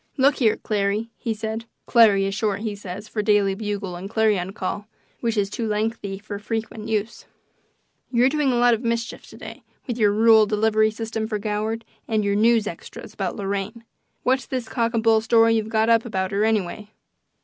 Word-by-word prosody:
"Look 275 +2 +4
here, 225 -5 +3
Clarry," 210 +1 -1
he 230 - -4
said 220 +1 -4 0.2
("Clarry" 215 -5 +5
is 195 - -2
short, 205 -1 -1
he 215 -2 -2
says, 200 +1 -8
for 215 - -2
Daily 205 -2 +3
Bugle 205 -2 -4
and 185 +3 -7
Clarion 210 -4 +1
Call, 205 +1 -4 0.3
which 230 -2 -1
is 200 -1 +2
"too 225 +3 -4
lengthy 210 -2 -2
for 205 0 -7
frequent 220 0 -4
use"), 220 +1 -2 0.9
"you're 245 0 +4
doing 285 -1 +1
a - - +1
lot 240 0 +5
of 225 - -1
mischief 235 0 -3
to - - -13
day - - -9 0.2
with 245 -3 -4
your 210 -2 +4
rural 220 0 +5
delivery 215 +1 +2
system 220 0 -4
for 215 -1 -2
Goward 215 +2 -3 0.2
and 215 -2 +1
your 200 - +1
news 225 +1 +3
extras 205 +4 -8
about 195 -4 -3
Lorraine. 200 +3 -4 0.4
What's 260 +1 +1
this 255 -3 -3
cock 230 0 -1
and 225 - 0
bull 225 -1 +4
story 225 0 +4
you've 220 -1 0
got 220 0 +2
up 230 -1 +4
about 190 -4 -2
her, 200 +1 +1
anyway?" 210 -1 -1
220 Hz, 195 wpm, -23 LUFS, 205-230 Hz, 0.9 s, Clarry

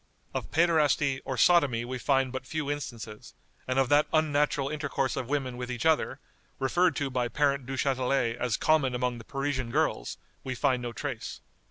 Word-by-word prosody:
Of - - -4
Pæderasty 150 -4 +3
or 130 - -3
Sodomy 135 -6 +4
we 130 +1 -4
find 135 0 +2
but 130 0 -6
few 155 -2 -2
instances; 115 -7 -7 0.3
and 130 +1 -1
of 135 -1 +3
that 145 +1 +4
unnatural 150 -3 +2
intercourse 140 -3 -1
of 125 - -4
women 135 -4 -1
with 125 0 -5
each 120 -2 -4
other, 160 -1 +2 0.4
referred 170 +5 +2
to 140 -2 -2
by 125 -1 0
Parent 140 0 0
Duchatelet 130 -2 0
as 120 -3 0
common 145 -5 +2
among 125 -1 -1
the - - -10
Parisian 135 -1 -2
girls, - - 0 0.3
we 130 -1 -4
find 130 -1 +1
no 120 -1 -4
trace." 125 -1 -5
135 Hz, 175 wpm, -28 LUFS, 125-145 Hz, 0.4 s, Sodomy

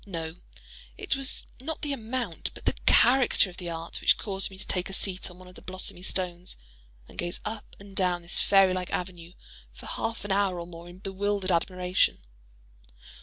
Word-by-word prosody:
No; 165 -3 -4 0.6
it - - 0
was 270 -1 -1 0.2
not 315 +3 -4
the 290 -1 +1
amount 230 -6 -2
but - - -11
the - - +3
character 245 -6 +6
of 175 - -14
the 175 -2 -5
art 165 0 -3
which - - +6
caused 195 -2 0
me 190 - -11
to - - -2
take 180 0 -1
a - - -6
seat 190 -1 -1
on 180 - -13
one 185 0 -12
of 180 - -12
the - - -13
blossomy 185 0 -4
stones 180 -1 -2 0.5
and - - -14
gaze 175 0 -1
up 215 0 -5
and 200 -1 -12
down 180 -2 +2
this 170 - 0
fairy 195 -2 +6
like 185 -1 -2
avenue 175 -1 -4 0.4
for - - -12
half 225 -2 -3
an 205 - -2
hour 195 -2 +2
or 170 - -4
more 170 0 -10
in 175 - -11
bewildered 195 0 -1
admiration. 180 +1 +2
185 Hz, 195 wpm, -29 LUFS, 175-200 Hz, 0.6 s, character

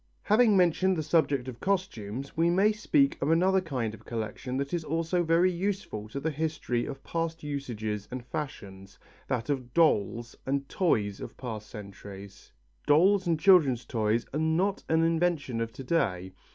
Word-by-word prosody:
Having 215 -1 +4
mentioned 185 +1 +3
the 155 - -1
subject 145 -4 +1
of 125 -3 -7
costumes, 140 - -3
we 165 +1 +3
may 195 +5 +4
speak 275 +6 +1
of - - 0
another 185 +4 +3
kind 125 -10 -3
of 110 0 -12
collection 120 +3 -4
that 140 +2 -3
is 170 -2 -1
also 165 +3 0
very 170 +2 +3
useful 180 - -3
to 140 - -4
the 160 +3 -1
history 150 -5 -2
of 135 - -7
past 165 -1 -3
usages 110 -8 -4
and 125 -1 -6
fashions, 100 -10 -7 0.3
that 120 -3 -2
of 130 -4 -3
dolls 120 - +2
and 140 +1 -2
toys 105 - 0
of - - -8
past 110 -4 -6
centuries. 100 -1 -11 0.4
Dolls 185 +6 +4
and 165 -2 +1
children's 155 -10 +5
toys 110 0 0
are 150 - -1
not 170 +6 +1
an 160 0 +3
invention 165 -7 0
of 115 0 -2
to 135 - -8
day. 95 - -1
145 Hz, 165 wpm, -28 LUFS, 115-170 Hz, 0.4 s, children's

